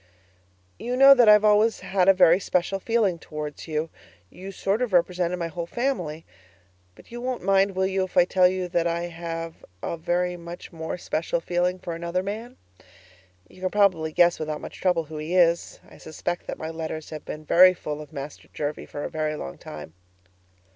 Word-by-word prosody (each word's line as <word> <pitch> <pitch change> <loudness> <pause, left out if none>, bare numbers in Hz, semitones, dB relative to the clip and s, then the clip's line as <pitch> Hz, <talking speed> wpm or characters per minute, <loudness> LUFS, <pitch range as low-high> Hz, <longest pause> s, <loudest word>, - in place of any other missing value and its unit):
You 245 +1 -3
know 275 +1 +9
that 245 -5 +5
I've 210 0 +7
always 215 +2 +3
had 190 -1 +2
a - - +8
very 175 0 +6
special 185 +1 -1
feeling 210 -5 +1
towards 150 -1 -7
you; 155 0 -2 0.4
you 190 +2 -9
sort 195 +3 -1
of 245 -6 -1
represented 180 0 +1
my 170 - -3
whole 170 +1 -5
family; 180 - -3 0.7
but - - -18
you 240 0 -7
won't 250 -3 -3
mind, 195 0 +3
will 190 0 +1
you, 190 0 0
if 185 - -9
I 175 - +7
tell 185 0 +4
you 185 0 -2
that 170 -1 +1
I 170 0 -1
have 165 -1 -6 0.2
a 170 - -3
very 175 +2 -1
much 170 +1 -10
more 160 +1 -5
special 170 -1 -2
feeling 175 +2 0
for 175 -2 -6
another 170 +2 -2
man? 220 +5 -6 0.9
You 185 - -18
can 185 - 0
probably 185 -6 +2
guess 175 +2 +3
without 155 -1 -3
much - - -10
trouble 180 -3 +2
who 155 0 -9
he 155 +4 -3
is. 170 -1 +2
I - - -16
suspect 175 +2 -5
that - - -5
my 160 +1 -5
letters 160 -1 -6
have 155 -1 -7
been 155 0 -8
very 185 +3 +6
full 150 -3 -5
of 150 - -12
Master 145 -1 -8
Jervie 145 0 -4
for 145 - -6
a - - -2
very 155 -1 -2
long 70 - -7
time. 75 +1 -9
175 Hz, 195 wpm, -25 LUFS, 160-190 Hz, 0.9 s, know